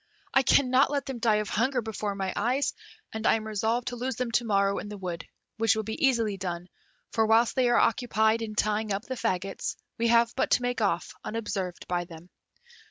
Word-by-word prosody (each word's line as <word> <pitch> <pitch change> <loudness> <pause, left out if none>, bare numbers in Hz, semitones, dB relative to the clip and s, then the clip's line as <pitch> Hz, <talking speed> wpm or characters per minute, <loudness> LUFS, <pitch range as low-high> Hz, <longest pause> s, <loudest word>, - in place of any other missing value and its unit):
I 270 - +6
cannot 260 0 +4
let 280 -2 -1
them 265 -3 -5
die 225 -2 +3
of 210 -2 -1
hunger 250 +4 +1
before 215 -3 -3
my 190 -1 -2
eyes, 250 +6 0 0.4
and 220 0 -1
I - - +5
am 220 -1 -4
resolved 220 +3 -1
to 245 - -6
lose 250 +1 -3
them 250 0 -2
to 240 - +2
morrow 200 -2 +2
in 205 - -7
the 210 - -7
wood, 175 -3 -5 0.3
which 225 -1 +3
will 220 - -2
be 220 +5 -4
easily 225 -6 +1
done, 180 -1 -5 0.4
for 220 -1 +2
whilst 225 +1 +4
they 255 -2 +3
are 240 - +4
occupied 225 -2 +2
in 215 -1 -5
tying 215 0 0
up 195 +2 -1
the 260 - -5
faggots, 195 -6 -2 0.2
we 235 - +2
have 235 0 +4
but 265 - 0
to 245 - +2
make 245 -1 -1
off 200 -4 0
unobserved 195 -5 -4
by 175 -1 -1
them." 170 +1 -13
220 Hz, 215 wpm, -28 LUFS, 200-240 Hz, 0.4 s, I